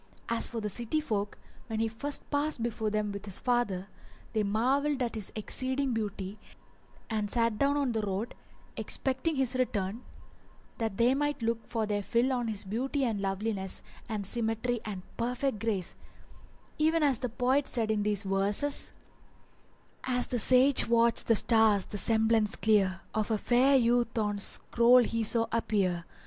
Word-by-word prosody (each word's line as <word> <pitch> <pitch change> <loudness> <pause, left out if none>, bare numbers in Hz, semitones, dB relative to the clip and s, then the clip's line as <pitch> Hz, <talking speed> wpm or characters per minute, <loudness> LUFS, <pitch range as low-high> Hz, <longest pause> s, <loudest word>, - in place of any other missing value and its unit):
As 230 0 +3
for 235 - -5
the 210 - -2
city 240 +8 -1
folk, 210 -9 -3 0.3
when 220 -2 -3
he 225 - +1
first 280 +6 -3
passed 290 -4 -1
before 220 -2 -2
them 210 -1 -1
with 200 0 -7
his 195 -2 -3
father, 240 -7 0 0.5
they 220 - +1
marvelled 260 +8 +1
at 235 - -2
his 215 -4 -5
exceeding 260 +4 -2
beauty 205 -2 -4 0.7
and 215 -2 -2
sat 230 -1 +1
down 280 +1 +2
on 275 -4 0
the 220 -1 -1
road 205 +3 -3 0.4
expecting 265 +5 -1
his 265 -2 +1
return, 220 -4 -1 0.8
that 220 -4 -2
they 240 +2 +4
might 290 -2 -1
look 230 0 -2
their 215 -3 -1
fill 235 +6 +1
on 245 -2 -1
his 210 -2 -3
beauty 255 +8 -2
and 220 -4 -1
loveliness 195 0 -2 0.3
and 210 -3 -3
symmetry 230 +2 -1
and 195 -4 -5
perfect 245 0 -1
grace; 205 -5 -1 0.9
even 315 +1 +3
as 270 -5 +2
the 250 - -2
poet 255 +4 +1
said 225 -3 0
in 215 -1 0
these 205 0 +1
verses:— 200 +8 +1 1.1
As 250 -1 +1
the 245 - -2
sage 255 +5 +5
watched 235 0 +2
the 230 - +5
stars, 220 -3 +4
the 205 - -4
semblance 220 -1 +2
clear 195 -4 +2
Of 215 -2 -1
a 220 - +1
fair 255 +5 +3
youth 240 -1 +1
on 210 -2 0
's - - +3
scroll 245 +1 +4
he 230 0 -1
saw 230 +1 +3
appear. 195 -7 0
225 Hz, 165 wpm, -30 LUFS, 210-250 Hz, 1.1 s, sage